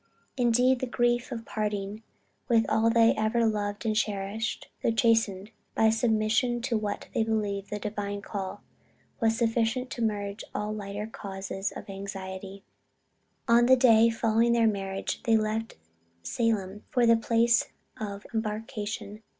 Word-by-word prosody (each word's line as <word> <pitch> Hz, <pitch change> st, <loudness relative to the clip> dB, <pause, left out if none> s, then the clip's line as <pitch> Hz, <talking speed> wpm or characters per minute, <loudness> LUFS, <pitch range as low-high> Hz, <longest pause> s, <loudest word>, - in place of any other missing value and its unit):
Indeed 250 Hz, +1 st, +3 dB
the 260 Hz, -, -2 dB
grief 240 Hz, +1 st, +1 dB
of 230 Hz, -2 st, -5 dB
parting 210 Hz, -1 st, -3 dB, 0.5 s
with 230 Hz, -2 st, +4 dB
all 225 Hz, +1 st, +3 dB
they 230 Hz, 0 st, +5 dB
had -, -, +1 dB
ever 230 Hz, +2 st, +2 dB
loved 210 Hz, 0 st, -1 dB
and 215 Hz, -1 st, +1 dB
cherished, 210 Hz, +2 st, -2 dB
though -, -, +2 dB
chastened 225 Hz, -3 st, +2 dB, 0.2 s
by 220 Hz, 0 st, +4 dB
submission 225 Hz, +2 st, +1 dB
to 235 Hz, -, 0 dB
what 210 Hz, -2 st, -3 dB
they 225 Hz, -, +2 dB
believed 205 Hz, -3 st, -2 dB
the 210 Hz, -, -3 dB
Divine 205 Hz, -1 st, -4 dB
call, 195 Hz, -2 st, -5 dB, 0.6 s
was 225 Hz, -1 st, +2 dB
sufficient 235 Hz, +2 st, 0 dB
to 235 Hz, -, -5 dB
merge 205 Hz, -2 st, -2 dB
all 210 Hz, 0 st, -2 dB
lighter 205 Hz, 0 st, -5 dB
causes 195 Hz, -2 st, -5 dB
of -, -, -8 dB
anxiety. 195 Hz, 0 st, -7 dB, 0.8 s
On 235 Hz, 0 st, +5 dB
the 260 Hz, -, +8 dB
day 230 Hz, -3 st, +6 dB
following 225 Hz, +1 st, +2 dB
their 230 Hz, -1 st, +3 dB
marriage 195 Hz, -2 st, -2 dB
they 225 Hz, -2 st, +3 dB
left 220 Hz, +1 st, -2 dB, 0.5 s
Salem 205 Hz, -, -1 dB
for 245 Hz, -2 st, +2 dB
the 230 Hz, 0 st, +6 dB
place 230 Hz, 0 st, +2 dB, 0.3 s
of 205 Hz, -1 st, -5 dB
embarkation. 215 Hz, -1 st, -4 dB
220 Hz, 145 wpm, -28 LUFS, 205-230 Hz, 0.8 s, the